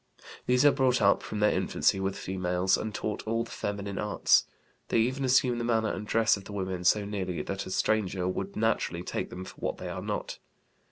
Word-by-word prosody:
These 125 +3 +4
are 145 - +8
brought 130 -2 +2
up 100 0 +4
from 105 - -5
their 105 - +5
infancy 95 - +1
with 95 0 -2
females, 90 0 0
and 110 - -3
taught 105 0 -3
all 115 +1 0
the 115 - -11
feminine 100 -1 -4
arts. 105 0 +3 0.4
They - - +1
even 130 +4 +1
assume 125 -2 +3
the - - -2
manner 110 -2 +1
and 105 +2 -6
dress 115 +1 +3
of 100 - -11
the 105 - -9
women 95 -2 -3
so 105 +2 +4
nearly 95 -4 -3
that 95 0 -4
a - - -6
stranger 95 -2 0
would 95 +1 -3
naturally 105 -5 0
take - - -3
them 95 +1 -7
for - - -11
what - - -3
they - - -6
are - - -5
not. - - -4
105 Hz, 215 wpm, -29 LUFS, 95-115 Hz, 0.4 s, are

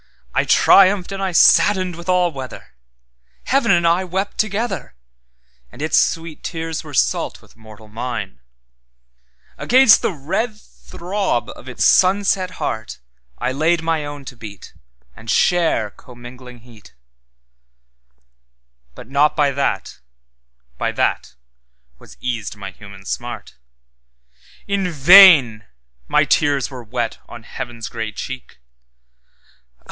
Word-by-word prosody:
I - - +1
triumphed 195 -1 +4
and 195 0 -5
I 190 -1 -1
saddened 185 +1 +4
with 170 +2 -10
all 180 -1 +2
weather, 135 -3 -9 0.7
Heaven 265 -3 +1
and 170 -2 +3
I 170 +3 +2
wept 190 +2 -4
together, 215 - -2 0.8
And - - -15
its 155 +2 -1
sweet 165 -1 0
tears 165 -1 -5
were 155 - -11
salt - - 0
with - - -22
mortal 110 -1 -15
mine; 110 - -6 1.2
Against 255 -2 +5
the - - 0
red 210 - -3
throb 190 - -4
of 130 - -12
its 125 - -1
sunset 190 -1 +3
heartI 110 0 -5 0.6
laid 160 +4 +1
my 165 -2 -1
own 145 -1 -8
to 130 - -9
beat, 105 -5 -11 0.4
And 110 +1 -12
share 160 -13 +1
commingling 125 +1 -13
heat; 115 - -18 2.0
But - - -12
not 140 +3 +2
by 145 -2 +2
that, 140 +1 -3 0.8
by - - -1
that, - - -2 0.6
was - - -16
eased 115 -5 -4
my 100 -1 -8
human 100 -1 -14
smart.In - - -8
vain 155 - +7 0.4
my - - +3
tears 145 -3 +1
were 130 -2 -8
wet 115 0 -4
on 115 - -11
Heaven's 115 0 -7
grey 110 -2 -5
cheek. 130 +4 -8
140 Hz, 120 wpm, -19 LUFS, 115-180 Hz, 2.0 s, vain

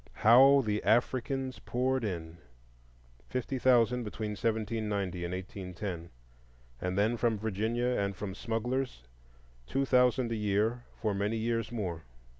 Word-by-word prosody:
How 135 +5 +7
the 105 0 -1
Africans 130 +2 +1
poured 130 +1 -1
in!—fifty - - -7
thousand 125 -1 +4
between 105 0 -4
1790 105 -4 -2
and 85 - -3
1810, 90 -2 -6 0.7
and 90 +1 -2
then, 110 +4 +2
from 115 -2 +1
Virginia 110 +3 -1
and 100 -6 0
from 95 0 -5
smugglers, 120 - -2 0.6
two 135 +1 0
thousand 125 -2 +3
a - - 0
year 110 +3 0
for 110 -2 0
many 100 +3 -1
years 115 -1 -1
more. 90 -8 -3
110 Hz, 120 wpm, -31 LUFS, 95-120 Hz, 0.7 s, How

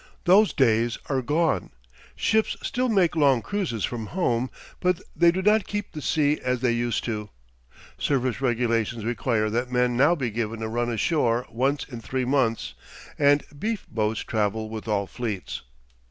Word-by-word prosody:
Those 195 +4 +5
days 115 -2 +2
are 135 -2 +1
gone. 150 - 0 0.5
Ships 220 0 +1
still 255 -1 0
make 190 -6 +3
long 140 -7 +3
cruises 160 - -2
from 115 -3 -5
home, 130 - 0 0.3
but 180 -2 +1 0.2
they 170 0 +5
do 185 +2 0
not 210 +1 +3
keep 205 0 -4
the 150 - -7
sea 150 0 +1
as 125 -1 -1
they 125 -2 +2
used 120 -1 -1
to. 105 -3 -4 0.7
Service 130 -3 0
regulations 115 -3 0
require 115 -2 0
that 120 +3 -1
men 125 -1 +2
now 145 +7 +4
be 130 -7 -2
given 110 0 -3
a - - -1
run 120 +2 -1
ashore 120 0 +1
once 135 +4 0
in 120 -4 -9
three 130 +2 -2
months; 125 -4 0 0.5
and 145 0 +4 0.2
"beef 220 +1 -2
boats" 110 -1 0
travel 110 0 -1
with 110 0 -6
all 100 -2 +1
fleets. 105 -3 -5
125 Hz, 165 wpm, -25 LUFS, 115-150 Hz, 0.7 s, Those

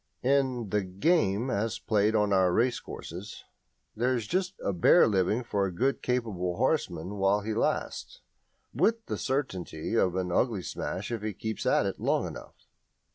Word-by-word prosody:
In 130 -5 +1
"the 105 - +2
game" 105 - +1
as 110 +1 -1
played 105 0 +1
on 105 -2 +2
our 95 -2 +4
racecourses 105 -4 -3 0.5
there 125 +3 +1
is 115 -3 -2
just 185 - -1
a 100 - +1
bare 90 - +6
living 105 +3 +1
for 100 -4 0
a - - -4
good 130 +10 0
capable 105 -8 -1
horseman 100 - -1
while 100 +1 +2
he 110 +2 -3
lasts, - - -2 0.5
with 225 0 +1
the - - -3
certainty 95 - -3
of 95 -6 +2
an 90 -1 -1
ugly 105 -1 +1
smash 95 +6 -4
if 115 -3 -3
he 105 0 -3
keeps 110 +3 -4
at - - +3
it - - -3
long - - +1
enough. - - -10
105 Hz, 165 wpm, -28 LUFS, 95-125 Hz, 0.5 s, bare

